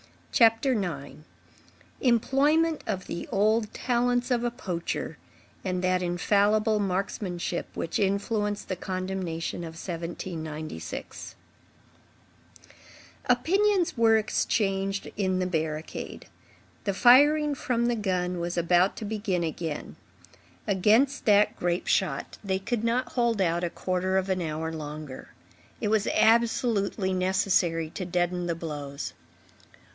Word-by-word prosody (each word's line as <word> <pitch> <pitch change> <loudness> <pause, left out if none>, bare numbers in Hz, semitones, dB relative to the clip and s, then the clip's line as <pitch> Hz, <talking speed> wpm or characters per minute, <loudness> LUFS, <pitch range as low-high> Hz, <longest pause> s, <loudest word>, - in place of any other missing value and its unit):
CHAPTER 230 +3 +4
IX—EMPLOYMENT 245 - -1
OF 185 -1 -2
THE 170 - -6
OLD 215 +2 +2
TALENTS 245 0 0
OF 240 -1 +2
A 240 - +1
POACHER 180 -7 -4 0.4
AND 185 -1 -2
THAT 185 0 +2
INFALLIBLE 205 +5 +2
MARKSMANSHIP 185 -2 -2
WHICH 165 - -2
INFLUENCED 205 +1 0
THE 185 - -3
CONDEMNATION 185 -3 -3
OF 165 -2 -7
1796 160 - -6 1.9
Opinions 365 +9 +2
were 225 -1 +5
exchanged 195 -2 0
in 190 -2 +1
the 185 - 0
barricade. 160 -3 -4 0.6
The 200 -2 0
firing 290 +6 +6
from 245 -3 -1
the 240 0 +1
gun 180 -4 -1
was 175 +1 -3
about 175 +2 +3
to 220 - -5
begin 205 -4 -1
again. 160 -1 -4 0.7
Against 220 +8 +3
that 210 -2 +4
grape 175 +1 -1
shot, - - 0
they 190 -2 0
could 225 +3 -2
not 235 +2 0
hold 235 -3 +1
out 170 -1 +1
a - - -1
quarter 185 +2 -1
of 190 0 0
an 185 -1 0
hour 160 0 -3
longer. 150 -3 -7 0.5
It 210 - -1
was 215 -1 +2
absolutely 225 -4 +2
necessary 185 -3 +1
to 185 - -5
deaden 175 0 -1
the 170 - -1
blows. 145 -4 -5
190 Hz, 115 wpm, -27 LUFS, 175-225 Hz, 1.9 s, firing